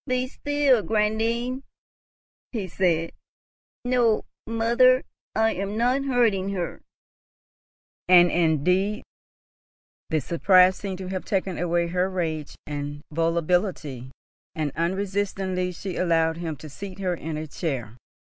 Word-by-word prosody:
"Be 255 0 0
still, 285 -3 +2
grandame," 225 +5 0 0.9
he 215 -6 -3
said. 165 -2 +1 0.7
"No, 245 -3 +2 0.2
mother, 235 +3 +4 0.3
I 220 0 +3
am 200 +3 -3
not 250 +4 +2
hurting 225 -7 +2
her," 175 -3 -4 1.3
and 175 -1 +7
indeed 180 - +1 1.1
the 160 - +1
surprise 180 +5 +4
seemed 195 -2 -5
to 185 -1 -6
have 185 -1 -3
taken 190 -3 -1
away 175 0 +1
her 180 +2 0
rage 160 -5 -3
and 145 0 -5
volubility, 165 - 0 0.5
and 155 -2 -1
unresistingly 190 +1 -1
she 180 +1 -6
allowed 165 -2 +2
him 165 -2 -4
to 155 - -11
seat 185 +6 -8
her 185 -2 -1
in 160 -2 -5
a 155 - -4
chair. 135 - -4
185 Hz, 120 wpm, -25 LUFS, 165-215 Hz, 1.3 s, and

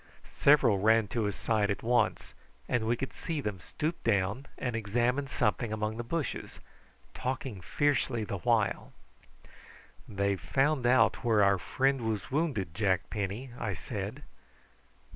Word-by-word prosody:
Several 135 -8 +4
ran 110 +1 +4
to 115 -1 -1
his 105 -2 -2
side 110 -3 +1
at 100 - -2
once, 120 -2 +1 0.3
and 110 -2 0
we 120 - +2
could 135 - -4
see 160 -3 -4
them 105 -8 -3
stoop 155 - -4
down 105 +4 0
and 125 -3 -2
examine 120 +6 0
something 115 -3 0
among 110 0 -2
the 120 - -3
bushes, 150 +5 -4 0.5
talking 130 -6 -4
fiercely 135 -1 0
the 100 -2 -4
while. 115 -1 +1 1.2
"They've 100 -1 -1
found 135 -2 +1
out 130 +1 +4
where 110 -4 +4
our 100 -1 +4
friend 135 +7 +1
was 105 0 -3
wounded, 130 - -1
Jack 95 -2 0
Penny," 105 +5 -3
I 110 -4 -2
said. - - -5
115 Hz, 145 wpm, -30 LUFS, 100-130 Hz, 1.2 s, Several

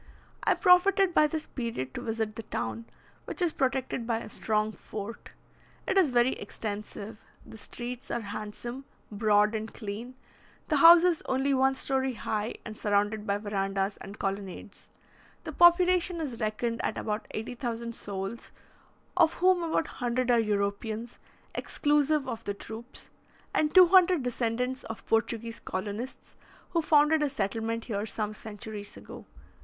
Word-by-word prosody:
I - - +3
profited 375 0 +5
by 305 - +5
this 310 +1 -4
period 230 - -4
to - - -5
visit 220 -2 -2
the 225 - -5
town, 115 - -4 0.4
which - - -6
is 350 -3 +2
protected 260 -3 -1
by 230 -2 +1
a 225 - -7
strong 215 0 0
fort. 215 +1 -8 0.5
It 385 - +1
is 375 -6 +5
very 245 +1 +3
extensive; 210 -1 -6 0.3
the - - -12
streets 245 +3 -7
are 235 - -1
handsome, 215 +5 -6 0.3
broad, 210 0 +3
and 220 0 -3
clean; 225 +4 -7 0.5
the 305 - +3
houses 335 +2 +7
only 265 +2 +1
one 265 0 +3
story 265 -1 0
high, 215 -1 -3
and 215 - -7
surrounded 210 +1 0
by 200 0 +1
verandahs 195 -1 -2
and 200 +2 -10
colonnades. 195 0 -5 0.5
The - - -5
population 350 0 +5
is 270 -8 -4
reckoned 225 +2 -1
at - - -1
about 210 0 -3
80,000 235 +1 -4
souls, 200 +2 -5 0.6
of 335 -3 +4
whom 365 0 +4
about 330 -1 0 0.2
100 245 +1 +1
are 240 - +5
Europeans, 215 +2 -2 0.3
exclusive 295 -1 +1
of 230 0 -5
the 200 - -2
troops, 225 +5 -9 0.4
and 300 -1 +2
200 365 -3 +7
descendants 250 +2 -1
of 225 -2 -7
Portuguese 230 0 -1
colonists, 205 +6 -5 0.4
who 335 - +2
founded 305 0 +4
a 295 - +2
settlement 225 -1 -2
here 210 -2 -3
some 215 0 -3
centuries 210 -1 -8
ago. - - -11
230 Hz, 145 wpm, -29 LUFS, 210-280 Hz, 0.6 s, houses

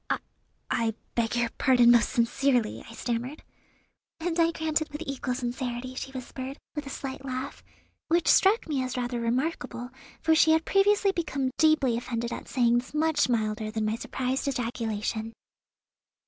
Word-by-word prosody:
"I - - +2 0.5
I 225 -1 +1 0.2
beg 235 0 0
your 240 -1 +1
pardon 245 -2 +6
most 235 -1 +5
sincerely," 245 -1 +1
I 230 - -10
stammered. 245 +6 -3 0.8
"And 335 +1 -1
I 330 0 +5
grant 320 -1 0
it 315 - -5
with 295 +3 -5
equal 265 -2 -2
sincerity," 245 0 -3
she 265 +1 -6
whispered, 260 +1 -6 0.2
with 295 -2 -5
a - - -5
slight 270 0 -6
laugh, 260 +1 -5 0.4
which 340 +1 +2
struck 400 +4 +5
me 290 -4 0
as 255 0 -3
rather 245 -1 -2
remarkable, 245 0 -2 0.3
for 320 0 +3
she 320 0 +6
had 320 0 +2
previously 400 0 +4
become 280 -7 -2
deeply 305 -7 +4
offended 235 0 -3
at - - -7
sayings 240 +1 +1
much 310 -3 +2
milder 215 -2 0
than 215 0 -2
my 215 +1 0
surprised 260 +3 -2
ejaculation. 225 -3 -2
255 Hz, 160 wpm, -27 LUFS, 235-300 Hz, 0.8 s, pardon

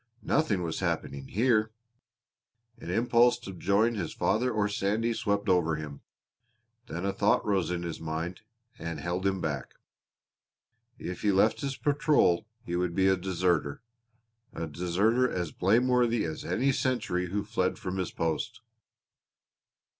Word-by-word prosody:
Nothing 110 - +1
was 80 -2 -3
happening 70 -1 -2
here! 110 -1 +2 1.1
An - - -8
impulse 120 +4 +4
to 105 -5 -9
join 100 +6 +2
his 105 - -3
father 125 +3 +1
or 105 -2 +1
Sandy 105 +3 0
swept 100 -2 -1
over 90 -4 +3
him; 75 -2 -7 0.9
then 85 +4 -4
a 100 - 0
thought 105 0 +2
rose 95 -5 +1
in 90 -1 -2
his 85 -2 -5
mind 80 +3 -4 0.4
and 85 0 -4
held 90 +2 -1
him 95 -1 0
back 75 -5 -3 1.2
if 90 - -6
he 105 - +3
left 95 +9 +3
his 140 -2 -3
patrol 145 - +2 0.2
he 85 - -3
would 90 -1 -1
be 95 0 +3
a 95 - +4
deserter, 90 -4 0 0.7
a 85 - -4
deserter 95 - +1
as 90 -6 -3
blameworthy 120 +3 +2
as 80 -1 -4
any 135 +3 +1
sentry 120 -9 0
who 100 +3 -2
fled 100 -4 -1
from 95 +1 -4
his 95 -2 -1
post. 85 +8 -2
95 Hz, 145 wpm, -29 LUFS, 85-115 Hz, 1.2 s, impulse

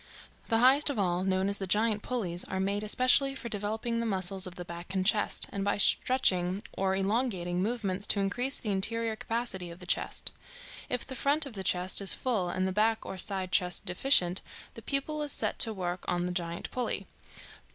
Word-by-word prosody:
The 225 - +3
highest 265 +5 +5
of 285 - -3
all, 180 -2 0
known 190 0 +1
as 200 0 -3
the 195 - -4
giant 210 +2 +1
pulleys, 190 -9 -1
are 190 - -4
made 200 +2 -1
especially 255 +5 +3
for 240 -3 -6
developing 220 +3 -2
the 230 - -1
muscles 190 -2 +1
of 180 - -9
the 175 - -7
back 170 +2 -8
and 185 -1 0
chest, 215 0 +3
and 200 - -3
by 200 - 0
stretching 195 -4 +2
or 190 0 0
elongating 195 -3 -1
movements 205 -3 -1
to 205 - +3
increase 245 +8 +1
the 215 - -3
interior 225 +3 0
capacity 225 -6 -3
of 170 - -10
the 180 - -11
chest. - - -1 0.6
If 250 - -1
the 265 - -7
front 285 +4 +1
of 275 - -9
the 195 -2 -5
chest 180 +1 +4
is 195 - +1
full 215 -9 -1
and 185 +1 -1
the - - -1
back 220 +3 +1
or 190 - -6
side 190 -2 0
chest 180 -2 +1
deficient, 180 -3 +2 0.3
the - - -10
pupil 295 +2 -1
is 295 -1 +2
set - - 0
to 225 - +2
work 180 -3 -4
on 175 0 0
the 180 - -2
giant 170 -1 -4
pulley. 250 -1 -2
200 Hz, 205 wpm, -29 LUFS, 185-230 Hz, 0.6 s, highest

